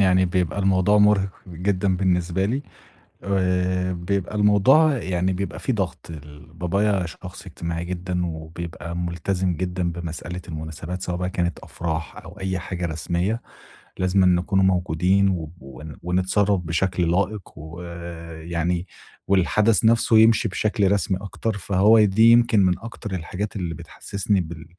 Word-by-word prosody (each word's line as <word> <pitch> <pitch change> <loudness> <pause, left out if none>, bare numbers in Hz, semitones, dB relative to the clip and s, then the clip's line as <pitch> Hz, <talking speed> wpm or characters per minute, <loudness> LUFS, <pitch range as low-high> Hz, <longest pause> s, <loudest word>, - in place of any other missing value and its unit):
يعني 95 -1 +4
بيبقى 90 -1 -1
الموضوع 95 +1 +3
مُرهِق 105 -2 +4 0.2
جدًا 95 +2 0
بالنسبة 90 0 +1
لي، 130 +8 -1 0.6
آآ، 90 -1 0
بيبقى 90 +2 -2
الموضوع 115 +9 +5
يعني 95 -4 -1
بيبقى 95 +1 -4
في 130 - -1
ضغط. 95 -7 -3
ال 75 -2 -11
بابايا 95 +2 0
شخص 90 +4 -10
اجتماعي 85 -1 -4
جدًا 90 0 -3
وبيبقى 85 +1 -6
ملتزِم 90 +2 -1
جدًا 90 0 -2
بمسألة 85 +1 -6
المناسبات، 80 +3 -6
سواء 90 -2 -2
بقى 90 +1 -2
كانت 90 -2 -1
أفراح 80 -2 -5
أو 100 - -11
أي 95 0 -2
حاجة 90 -1 -4
رسمية، 85 +8 -2 0.6
لازِمًا 95 +1 +2
نكونوا 90 +2 +2
موجودين، 90 -1 +2
ون 75 +2 -10
ونتصرَّف 95 +3 +1
بشكل 85 +1 0
لائِق، 100 +3 0 0.2
ويعني 85 +1 -5 0.4
والحدَث 105 +4 +3
نفسه 115 0 +4
يمشي 110 +1 +5
بشكل 105 0 +1
رسمي 95 -2 +1
أكتر. 100 +2 -3
فهو 100 +3 +4
دي 110 +2 +5
يمكن 115 -2 +5
من 90 -1 +1
أكتر 115 -2 -7
الحاجات 95 +4 -4
اللي 85 -4 -3
بتحسّسني 100 +4 -2
بال 80 -1 -8
90 Hz, 135 wpm, -23 LUFS, 85-100 Hz, 0.6 s, الموضوع